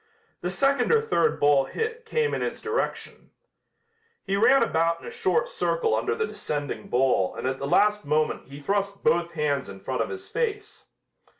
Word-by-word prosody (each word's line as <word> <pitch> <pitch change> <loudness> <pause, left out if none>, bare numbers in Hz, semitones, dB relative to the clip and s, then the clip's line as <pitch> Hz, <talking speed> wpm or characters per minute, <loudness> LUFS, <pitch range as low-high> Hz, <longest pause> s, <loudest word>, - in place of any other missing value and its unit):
The 175 - -2
second 275 - +2
or 460 - +6
third 450 +1 +1
ball 145 -2 +4
hit 455 - -4
came 460 0 0
in - - -1
his - - -3
direction. 450 +2 -3 0.9
He 195 - -1
ran 230 +6 +5
about 165 -4 +1
in - - -13
a - - -6
short 475 +1 0
circle - - 0
under 445 - 0
the 450 0 0
descending 145 - -5
ball 125 -7 +2
and - - -5
at 130 +1 -1
the 140 - -3
last 210 +6 +3
moment 150 -1 0
he 140 +2 -10
thrust 200 +5 -2
both 170 0 +2
hands 145 -4 -1
in 95 - -9
front 130 +7 -3
of - - -2
his 380 -1 -7
face. 430 -3 -3
200 Hz, 185 wpm, -26 LUFS, -, 0.9 s, or